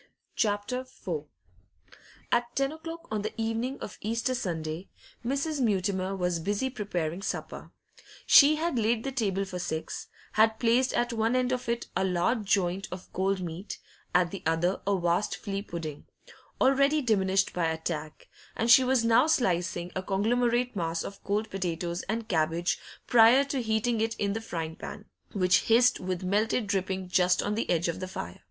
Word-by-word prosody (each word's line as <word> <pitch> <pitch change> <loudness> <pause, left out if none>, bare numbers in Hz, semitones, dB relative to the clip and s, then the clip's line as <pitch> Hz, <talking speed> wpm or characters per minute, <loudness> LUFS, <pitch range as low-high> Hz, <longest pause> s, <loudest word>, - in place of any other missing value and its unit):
CHAPTER 205 +3 0
IV 260 - -6 1.1
At 240 0 +1
ten 275 +1 +1
o'clock 330 +1 -8
on 215 -1 -1
the 215 +2 -5
evening 225 +4 -1
of 210 - -7
Easter 230 +4 -1
Sunday, 165 -6 -4 0.3
Mrs. 280 +4 -1
Mutimer 195 -3 0
was 180 -2 -1
busy 205 +9 -1
preparing 180 -7 -3
supper. - - -5 0.6
She 295 +2 +8
had 315 -5 -1
laid 225 +1 +1
the 270 - -3
table 200 -6 -1
for 180 -2 -6
six, 160 -2 -4 0.2
had 220 0 +3
placed 240 +3 +3
at 240 0 0
one 225 +2 +1
end 255 0 +1
of 250 -2 -2
it 235 0 -1
a 190 - +1
large 190 +5 +1
joint 190 -1 +1
of 180 0 -9
cold 190 +1 0
meat, 175 +3 -6 0.4
at 180 -1 +3
the 195 - -6
other 165 +4 +1
a 200 -1 +3
vast 175 +4 +1
flee 200 -2 -4
pudding, 165 -6 -7 0.5
already 275 +3 +3
diminished 195 -4 +2
by 175 -2 0
attack, 160 -1 -4 0.3
and 230 +1 +2
she 255 +3 +9
was 255 -2 +2
now 230 +5 +5
slicing 180 - 0
a 190 - -1
conglomerate 240 +5 +1
mass 165 -2 -1
of 200 - -9
cold 210 +2 -1
potatoes 175 -2 -2
and 225 +1 -2
cabbage 165 -1 0 0.3
prior 240 +3 +6
to 280 -2 -2
heating 220 0 0
it 225 0 0
in 200 -1 -1
the 225 - -3
frying 165 -7 -4
pan, 205 - -8 0.3
which 185 -2 +3
hissed 240 +2 +4
with 185 -1 -3
melted 210 +5 +1
dripping 190 -2 -2
just 180 0 +3
on 205 - -1
the 225 - -2
edge 170 0 +2
of 170 - -2
the 185 - -4
fire. 85 - -7
205 Hz, 170 wpm, -28 LUFS, 180-240 Hz, 1.1 s, she